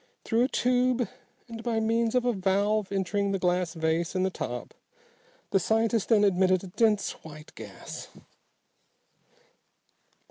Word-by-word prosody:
Through 235 +2 +2
a - - +1
tube, 250 -2 +1 0.4
and 230 -1 -8
by 230 -1 -1
means 225 +1 +1
of 250 -1 +2
a 245 - +2
valve 200 +1 +1
entering 200 +1 0
the - - +1
glass 180 -1 0
vase 160 +2 -1
in 185 - +1
the 190 - 0
top, - - -5 0.8
the 195 - +4
scientist 225 +2 +1
then 215 -3 +5
admitted 185 -1 +3
a - - -7
dense 210 +1 +2
white 155 -1 -12
gas. - - -9
205 Hz, 140 wpm, -28 LUFS, 185-230 Hz, 0.8 s, then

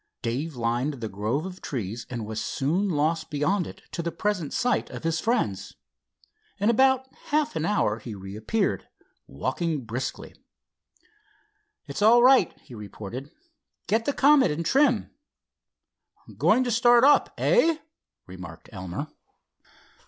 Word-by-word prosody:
Dave 140 +7 -2
lined 120 +5 -1
the 115 -4 -5
grove 110 - -2
of 190 0 -8
trees 115 -3 -5
and 120 -3 -4
was 110 0 -4
soon 175 +9 0
lost 160 0 0
beyond 165 +6 0
it - - -12
to - - -3
the 170 0 -3
present 185 -8 -2
sight 245 0 0
of - - -8
his 165 0 0
friends. 215 - -1 0.8
In 205 +4 +3
about 265 +2 +3 0.2
half 305 0 0
an 160 - -1
hour 115 - +1
he 110 -1 -7
reappeared, 100 - -2 0.4
walking 135 - -2
briskly. 120 +4 -5 1.5
"It's - - -6
all 235 +3 +6
right," 255 -8 +6
he - - -15
reported. 110 +5 -8 0.6
"Get 225 +2 +1
the 285 - 0
Comet 280 -1 +5
in 150 +3 -2
trim." 255 - +2 1.2
"Going 255 - +3
to 245 - -1
start 240 +1 +5
up, 290 +2 +5
eh?" 330 -10 +3 0.5
remarked 90 -2 -11
Elmer. 95 - -5
160 Hz, 135 wpm, -26 LUFS, -, 1.5 s, all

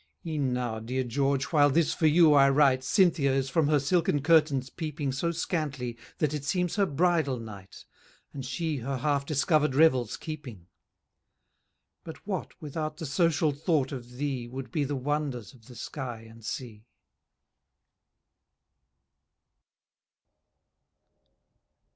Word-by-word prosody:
E'en 150 -5 -1
now, 120 -3 -2
dear 125 +4 -2
George, 135 +2 0
while 145 -2 +5
this 160 +2 +2
for 160 - +2
you 155 0 +6
I 140 -1 +6
write, 135 -2 +3
Cynthia 160 -3 +3
is 135 -1 -1
from 155 0 +2
her 150 0 +4
silken 165 +1 +1
curtains 150 -5 +3
peeping 150 -4 -3
So 140 +6 -1
scantly, 150 -7 -3 0.2
that 150 -2 0
it 150 -2 -3
seems 180 +3 -1
her 200 -2 +2
bridal 160 -3 +1
night, 105 -5 -10 0.5
And 135 - -6
she 150 +4 -2
her 135 +2 -3
half 140 +1 0
discover'd 150 -1 +2
revels 130 -7 +3
keeping. 140 - -8 1.4
But 160 - -10
what, 190 -5 -5
without 155 +1 -4
the 165 - -5
social 155 +1 +2
thought 145 -2 0
of 125 -3 -8
thee, 130 -2 -3
Would 130 +2 -7
be 155 -4 0
the 145 +1 -2
wonders 140 -4 -3
of 115 -4 -20
the 125 - -12
sky 120 -2 -6
and 115 0 -15
sea? 110 -1 -6
140 Hz, 135 wpm, -28 LUFS, 130-155 Hz, 1.4 s, you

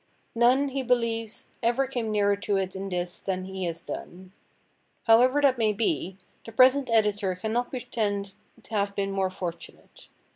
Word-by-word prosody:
None, 250 +4 +3
he 270 0 -2
believes, 230 -3 -1
ever 240 +4 +2
came 245 -4 -3
nearer 205 -1 +2
to 200 0 -1
it 190 -1 -2
in 195 +1 -4
this 175 -1 -3
than 185 -1 -3
he 190 -1 -4
has 165 -1 -4
done. 185 +1 -8 0.7
However 255 +5 +5
that 260 -3 +4
may 215 -2 +2
be, 190 - -1 0.3
the 225 - -9
present 255 +3 +5
editor 210 -4 +2
cannot 220 +6 -2
pretend 210 -6 -3 0.3
to - - -19
have 200 -1 0
been 195 0 -1
more 195 -1 0
fortunate. 175 -2 -8
210 Hz, 160 wpm, -27 LUFS, 190-240 Hz, 0.7 s, However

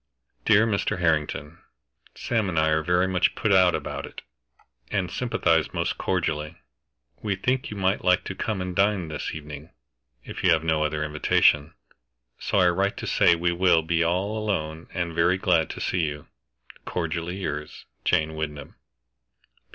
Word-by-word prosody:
"DEAR 105 +2 +5
MR. 105 -4 -1
HARRINGTON, 80 -2 -1 0.6
Sam 110 -5 -1
and 85 - -3
I 80 0 +3
are 80 0 +2
very 90 +3 +2
much 95 -1 +1
put 110 - 0
out 95 -2 +5
about - - -5
it, - - -11 0.7
and 95 -4 -1
sympathize 85 - 0
most - - -2
cordially. 75 -4 -1 0.7
We 100 -3 -1
think 125 +7 -1
you 105 - -7
might 95 0 0
like 90 0 +3
to - - -5
come 100 0 -3
and 90 -1 -5
dine 100 -4 +1
this 75 0 -4
evening, 75 0 -9 0.5
if - - -8
you 90 - +4
have 80 -1 0
no 80 -1 +1
other 75 0 -1
invitation, 75 0 +2 0.6
so - - -1
I 90 -2 +5
write 100 +3 0
to - - -5
say - - +4
we 85 +1 0
will 85 -2 +3
be 85 +1 +1
all 95 +6 0
alone 80 -7 -3
and 85 -2 -3
very 85 +3 +2
glad 90 -5 +2
to - - -7
see 90 - -1
you. 75 -2 -3 0.6
Cordially 85 +1 -3
yours, 75 -5 -5 0.2
"JANE 80 0 +1
WYNDHAM." 75 -2 -5
85 Hz, 165 wpm, -25 LUFS, 80-95 Hz, 0.7 s, DEAR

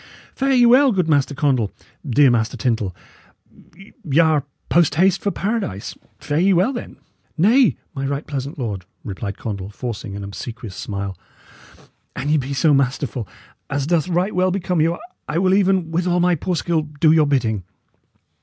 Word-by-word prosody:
Fare 270 0 0
ye 245 -2 +5
well, 255 +3 +6
good 185 -6 0
Master 145 -2 +2
Condall, 130 -7 +1 0.3
dear 140 -1 +4
Master 115 -2 0
Tyndal; 110 -8 -1 1.1
y' 145 -2 -1
are 155 -4 +3 0.2
post 170 -3 +3
haste 185 +3 +3
for 205 - 0
Paradise; 200 - -3 0.2
fare 145 +1 -2
ye 190 +3 +4
then 195 +10 +2
well!" 240 - -7 0.4
"Nay, 225 - +4 0.2
my 135 0 -3
right 140 +2 -3
pleasant 140 +1 -5
lord," 105 -8 -4 0.2
replied 100 0 -5
Condall, 100 -3 -5
forcing 105 -2 -6
an 100 - -6
obsequious 105 0 -7
smile, 100 -2 -4 1.0
"an 145 - -3
ye 155 - +4
be 135 -1 -3
so 150 +3 +3
masterful, 130 -4 0 0.4
as 135 0 -1
doth 165 0 +1
right 180 +4 0
well 185 +1 +2
become 180 -3 0
you, 165 +2 +1 0.3
I 150 - -1
will 185 +1 +3
even, 190 -4 +2
with 175 +2 0
all 180 0 +2
my 180 0 +3
poor 175 +3 -1
skill, 165 -1 0
do 150 +1 +1
your 155 -2 +4
good 140 - +3
bidding." 110 -6 -1
150 Hz, 175 wpm, -21 LUFS, 125-180 Hz, 1.1 s, well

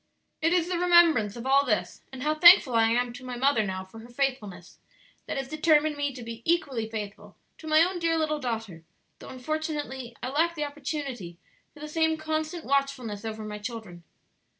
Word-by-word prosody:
"It 325 +2 +2
is 350 -1 +2
the 355 -1 -2
remembrance 340 - +4
of 235 +1 -8
all 275 +1 +4
this, 235 -6 -2
and 265 -1 -7
how 305 +1 +1
thankful 340 -4 +7
I 225 -1 +4
am 240 +1 0
to 255 - -11
my 250 -1 -6
mother 265 -3 +2
now 190 -2 -4
for 190 +4 -13
her 230 +2 -13
faithfulness, 250 -6 -4 0.5
that - - -3
has 270 -1 -3
determined 310 0 +2
me 285 -1 -1
to 250 - -8
be 230 0 -8
equally 275 -10 0
faithful 210 -3 -7 0.2
to 315 - -10
my 310 +1 +5
own 360 +1 -1
dear 330 -1 +1
little 305 -1 0
daughter, 225 - -5 0.4
though - - -11
unfortunately 265 -3 -4
I 255 - -2
lack 330 +5 +1
the 300 -2 -2
opportunity 275 - -6 0.3
for 295 - -16
the 300 - -6
same 320 +1 +1
constant 315 +2 -3
watchfulness 270 -6 -1
over 220 -1 -5
my 210 0 -6
children." 210 -6 -8
275 Hz, 195 wpm, -27 LUFS, 230-310 Hz, 0.5 s, thankful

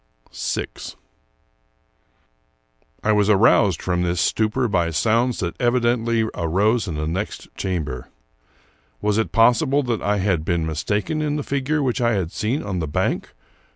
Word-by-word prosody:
VI - - -2 2.4
I 110 - +2
WAS 105 -1 +3
aroused 105 -3 +4
from 90 -1 0
this 90 0 0
stupor 110 +7 +1
by 85 -5 +1
sounds 115 +10 +1
that 85 -3 -2
evidently 120 -2 +2
arose 100 +7 +1
in 85 - -4
the 75 +1 -2
next 90 +7 -4
chamber. 80 -9 -3 0.9
Was 105 +1 +1
it 110 - -1
possible 130 +5 +3
that 120 -3 -2
I 105 0 +1
had 95 -5 0
been 85 -1 0
mistaken 105 - -1
in 150 -1 -1
the 150 - -2
figure 140 +2 -1
which 125 -2 0
I 120 -1 +2
had 90 -5 -1
seen 120 +8 -2
on 95 -3 -3
the 80 - -2
bank? 75 - -2
105 Hz, 150 wpm, -22 LUFS, 90-120 Hz, 2.4 s, aroused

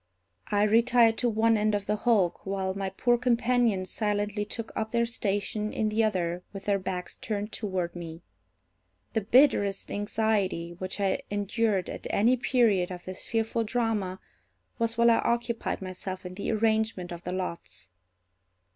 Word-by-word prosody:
I 205 0 +2
retired 230 +1 +4
to 245 - +2
one 225 0 +3
end 210 0 +2
of 200 -1 -2
the 210 - 0
hulk, 210 -5 +1
while 190 -1 -2
my 195 0 -3
poor 240 +5 +1
companions 235 -5 +2
silently 210 -1 -1
took 225 +1 -6
up 220 0 -2
their 235 0 +2
station 210 -1 -1
in 215 - 0
the 220 +1 +2
other 180 -5 0
with 195 -1 -8
their 200 -1 +2
backs 180 -1 -4
turned 210 0 -4
toward 185 -5 -2
me. 165 -1 -8 0.9
The 220 - +1
bitterest 210 -3 +3
anxiety 205 -5 0
which 185 +3 -6
I 195 -1 +1
endured 205 -1 0
at - - -6
any 235 +5 +3
period 230 -8 +2
of 180 -1 -8
this 185 0 -6
fearful 225 0 -1
drama 215 -5 -1 0.6
was 230 0 0
while 235 0 +6
I 230 - +4
occupied 235 -3 -1
myself 185 0 -6
in 180 - -6
the 200 - -4
arrangement 220 -4 0
of 175 0 -7
the 180 - -4
lots. 95 - -5
210 Hz, 160 wpm, -28 LUFS, 190-225 Hz, 0.9 s, while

